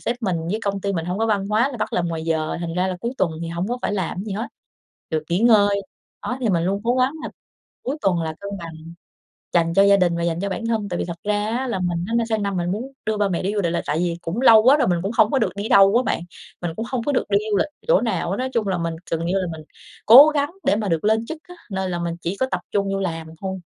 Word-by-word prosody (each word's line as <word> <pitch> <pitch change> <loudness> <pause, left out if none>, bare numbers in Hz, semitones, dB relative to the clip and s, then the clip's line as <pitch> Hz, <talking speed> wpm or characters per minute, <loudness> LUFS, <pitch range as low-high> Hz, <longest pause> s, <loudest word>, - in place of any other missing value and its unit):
sếp 235 - -2
mình 190 -5 0
với 215 +3 -1
công 200 -1 -1
ty 200 +1 -1
mình 165 -3 -2
hông 180 +3 -2
có 225 - +1
văn 200 -3 0
hóa 225 +5 +2
là 245 - -6
bắt - - -2
làm 175 -1 0
ngoài 165 -1 -3
giờ, 160 -1 -1
thành 170 -1 -4
ra 185 +1 +1
là 185 - -3
cuối 235 +3 -2
tuần 185 -4 +1
thì 165 - -4
hổng 170 +5 -3
có 245 +1 -2
phải - - -1
làm 190 -4 -2
cái 195 - -4
gì 210 - -5
hết, 220 +6 -3 0.6
được 155 -1 -1
nghỉ 175 - +2
ngơi. 205 -4 +4 0.4
Đó, 250 - -3
thì 235 - 0
mình 170 -4 +1
luôn 200 +2 0
cố 240 - +2
gắng 255 +2 +2
là - - -4 0.5
cuối 275 +4 -3
tuần 180 -4 +2
là 160 -1 -3
cân 200 - -6
bằng, 165 -1 -8 0.8
dành 165 -1 +2
cho 195 +3 +5
gia 200 0 +6
đình 175 -3 +2
và 170 - -2
dành 170 0 -1
cho 200 - -2
bản 230 +4 -4
thân. 215 -3 -1
Tại 175 - -3
vì - - -1
thật 170 -1 -6
ra 210 0 0
á 260 +1 -2
là 210 -6 -2
mình 175 -1 -1
á 230 - 0
sang 220 -1 0
năm 200 -2 -1
mình 175 0 -1
muốn 240 +7 -4
đưa 215 -1 0
ba 205 -1 +1
mẹ 180 -1 -2
đi 200 - -1
du 205 - 0
lịch, 170 -1 -1
là - - 0
tại 150 - -1
vì 170 -1 -1
cũng 185 +9 -3
lâu 225 -4 +7
quá 270 +5 +6
rồi 280 - +2
mình 175 -2 +1
cũng 195 - -2
hông 215 - +5
có 270 - +2
được 220 - -1
đi 205 +2 -4
đâu 195 +3 +6
á 250 - +2
bạn. 250 - -1 0.4
Mình 175 -2 -2
cũng 225 - -4
hông 250 -3 -2
có 290 - 0
được 260 - +1
đi 200 - +4
du 205 - +3
lịch - - +1 0.2
chỗ - - +4
nào 215 -8 -1
hết - - 0
á. - - 0
Nói 260 - -2
chung 220 -3 0
là 185 -2 0
mình 165 -1 -2 0.2
gần 165 0 -1
như 175 - 0
là 185 - -2
mình 160 -1 -8 0.4
cố 265 +8 +10
gắng 290 0 0 0.2
để - - +4
mà 210 -1 -2
được 165 -1 0
lên 220 +1 +2
chức 320 +6 -6
á, 355 0 -13
nên 190 -2 -2
là 175 - -2
mình 170 -1 -2
chỉ 180 +4 -3
có 260 - +1
tập 185 - 0
trung 200 -1 0
vô 195 - -1
làm 165 -4 -3
thôi. 190 -1 -4
195 Hz, 315 wpm, -22 LUFS, 175-225 Hz, 0.8 s, cố